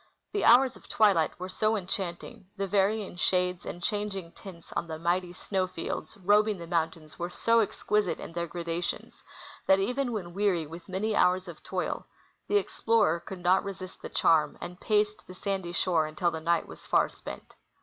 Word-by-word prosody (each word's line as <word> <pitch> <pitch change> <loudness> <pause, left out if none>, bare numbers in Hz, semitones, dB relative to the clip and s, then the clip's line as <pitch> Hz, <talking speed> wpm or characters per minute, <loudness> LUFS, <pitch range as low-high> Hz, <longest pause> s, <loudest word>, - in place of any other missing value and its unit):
The 410 - 0
hours 250 +2 +6
of - - -16
twilight 195 -10 +3
were 185 - -4
so 215 +3 +1
enchanting, 180 -2 -4
the 195 - 0
varying 200 0 +1
shades 180 -1 +1
and 175 - -6
changing 205 -5 -2
tints 175 -3 -12
on 170 - -2
the 160 -1 -5
mighty 175 +2 0
snow 185 +1 -1
fields 165 -1 -5
robing 205 +2 +3
the 170 - -7
moun 165 -1 +1
tains 155 -1 -15
w^ere 175 0 -3
so 230 +5 +3
exquisite 210 -2 0
in - - -8
their 170 0 -2
gradations 170 +1 -4 0.5
that, 190 - +7
even 250 +6 0
when 180 -6 -4
weary 190 -4 +1
with 165 +4 -10
many 210 +3 -1
hours 185 +1 +3
of 170 -3 -9
toil, 185 -1 -3 0.4
the 415 - +4
explorer 225 - +2
could 180 0 -9
not 185 +2 +4
resist 190 -2 -7
the - - -6
charm, 155 -3 +3
and 180 +1 -7
paced 210 0 +1
the 185 - -10
sandy 190 -2 -2
shore 170 -3 +2
until 170 +3 0
the 160 -1 -5
night 170 +1 +1
was - - -11
far - - +4
spent. - - -10
185 Hz, 185 wpm, -29 LUFS, 170-205 Hz, 0.5 s, that